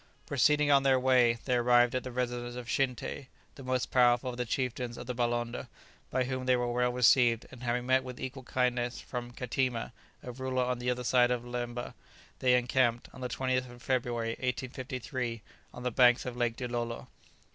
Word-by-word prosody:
Proceeding 145 +2 +3
on 140 -1 +6
their 135 -1 +3
way, 125 -2 +4
they 130 - 0
arrived 120 0 +4
at 130 -1 -1
the 130 - -6
residence 120 -1 -3
of 125 -1 -6
Shinté, 130 +1 -2 0.3
the - - -12
most 130 -1 -1
powerful 125 0 +4
of 120 - -9
the 125 -1 -2
chieftains 125 -1 -2
of 120 - -7
the 125 - -3
Balonda, 120 -1 -2 0.4
by 130 - +1
whom 130 0 -4
they 130 - +5
were 120 -1 -1
well 125 0 +2
received, 120 -1 +4
and 130 - -12
having 125 0 -1
met 130 +1 +3
with 125 -1 -8
equal 130 +1 -5
kindness 125 -1 -1
from 120 -1 -6
Kateema, 125 -1 -2 0.3
a 125 - -6
ruler 130 +1 -1
on 125 -1 -1
the 125 0 -1
other 125 0 -1
side 125 0 +4
of 125 -1 -1
the 120 - -10
Leeba, 120 0 -4 0.5
they 125 -1 +4
encamped, 120 -1 +1
on - - -11
the 125 - -3
20th 130 0 -1
of 120 0 -13
February, 120 -3 -1
1853, 125 -1 -4 0.3
on 125 - -9
the 125 - -1
banks 125 +1 +5
of 125 -1 -4
Lake 120 -2 0
Dilolo. 120 -2 -3
125 Hz, 195 wpm, -30 LUFS, 120-130 Hz, 0.5 s, on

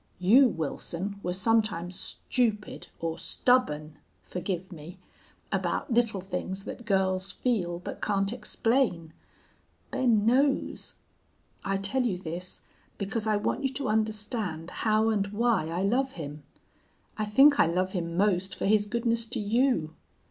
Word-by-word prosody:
You, 230 +9 +6
Wilson, 180 - -4
were 180 - -2
sometimes 190 -3 +1
stupid 220 -1 -2
or 165 0 -3
stubborn 155 -12 +1 0.2
(forgive 185 0 -4
me) 170 +2 -10 0.5
about 255 - -1
little 230 -5 +2
things 190 +1 -4
that 240 - -8
girls 190 -2 +1
feel 185 -9 -1
but 175 - -7
can't 195 0 0
explain. 225 -10 0 0.8
Ben 225 -5 +2
knows. 270 +4 +1 0.7
I 195 0 0
tell 195 +7 0
you 230 -7 0
this 180 +1 -6 0.3
because 215 +2 -2
I 215 -1 +3
want 205 - -1
you 270 - +1
to 265 -3 -2
understand 210 -6 -1
how 220 0 +2
and 205 -3 +1
why 210 -4 +1
I 170 +3 -2
love 260 +6 +1
him. 150 -2 -7 0.7
I 215 - -1
think 275 +7 +6
I - - +6
love 185 +3 0
him 170 -3 -3
most 190 -1 +1
for - - -3
his 205 +1 +3
goodness 230 +1 0
to - - -3
you. 215 - +1
200 Hz, 140 wpm, -28 LUFS, 180-230 Hz, 0.8 s, You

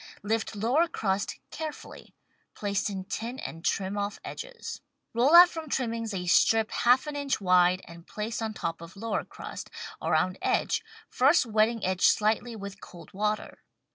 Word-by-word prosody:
Lift 220 +1 -1
lower 250 +11 +2
crust 205 -10 -2
carefully, 315 -1 -8 0.4
place 200 0 -1
in 190 -2 -4
tin 235 +6 -4
and 165 -9 -7
trim 195 +1 -1
off 200 0 -3
edges. - - -7 0.3
Roll 255 +8 +4
out 350 +1 +11
from 320 -3 -7
trimmings 230 -4 -2
a 185 -2 -3
strip 220 +5 +4
half 245 +4 +3
an 300 -1 -5
inch 285 -1 -1
wide 180 -1 +4
and 170 0 -13
place 220 +2 -4
on 220 -1 -3
top 165 -3 -4
of 170 +2 -11
lower 225 +2 -2
crust, - - -9 0.3
around 180 +4 +1
edge, 465 - +1 0.2
first 270 +3 +4
wetting 220 0 +1
edge 185 0 +3
slightly 220 +2 +1
with 200 -2 -8
cold 170 -3 -13
water. 210 +2 -2
215 Hz, 160 wpm, -28 LUFS, 190-245 Hz, 0.4 s, out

